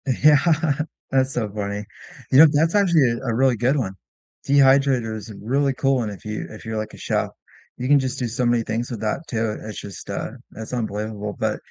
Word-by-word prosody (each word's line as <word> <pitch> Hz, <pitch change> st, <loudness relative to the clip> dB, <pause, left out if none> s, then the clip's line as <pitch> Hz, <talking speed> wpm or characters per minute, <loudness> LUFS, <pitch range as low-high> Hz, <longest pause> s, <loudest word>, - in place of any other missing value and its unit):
Yeah, 145 Hz, +3 st, +5 dB, 0.7 s
that's 135 Hz, 0 st, +2 dB
so 110 Hz, -4 st, -1 dB
funny. 105 Hz, 0 st, -3 dB, 0.5 s
You 135 Hz, -, +6 dB
know, 160 Hz, -, +10 dB
that's 160 Hz, +5 st, +2 dB
actually, 170 Hz, -11 st, +4 dB
uh, 120 Hz, +3 st, -5 dB
a 115 Hz, -, 0 dB
really 130 Hz, 0 st, +3 dB
good 125 Hz, +6 st, +2 dB
one. 100 Hz, -8 st, -2 dB, 0.5 s
Dehydrator 135 Hz, -4 st, +4 dB
is 110 Hz, +1 st, -8 dB
a 105 Hz, -, -9 dB
really 135 Hz, +5 st, +1 dB
cool 135 Hz, 0 st, +1 dB
one 115 Hz, -4 st, -1 dB
if 100 Hz, -1 st, -10 dB
you 105 Hz, 0 st, -4 dB
if 110 Hz, -, -11 dB
you're 110 Hz, 0 st, -3 dB
like 110 Hz, 0 st, -4 dB
a -, -, -11 dB
chef. -, -, -1 dB, 0.5 s
You 125 Hz, -, -3 dB
can 145 Hz, +1 st, +6 dB
just 130 Hz, 0 st, -3 dB
do 125 Hz, -, -1 dB
so 115 Hz, +2 st, -1 dB
many 120 Hz, -1 st, +2 dB
things 115 Hz, +2 st, -3 dB
with 115 Hz, -, -5 dB
that 110 Hz, +5 st, -1 dB
too. 110 Hz, -2 st, -2 dB
It's 110 Hz, -1 st, -6 dB
just, 100 Hz, -2 st, -9 dB
uh, -, -, -3 dB, 0.2 s
that's 110 Hz, 0 st, -8 dB
unbelievable, 105 Hz, -2 st, -3 dB
but, -, -, 0 dB
120 Hz, 215 wpm, -22 LUFS, 110-135 Hz, 0.7 s, know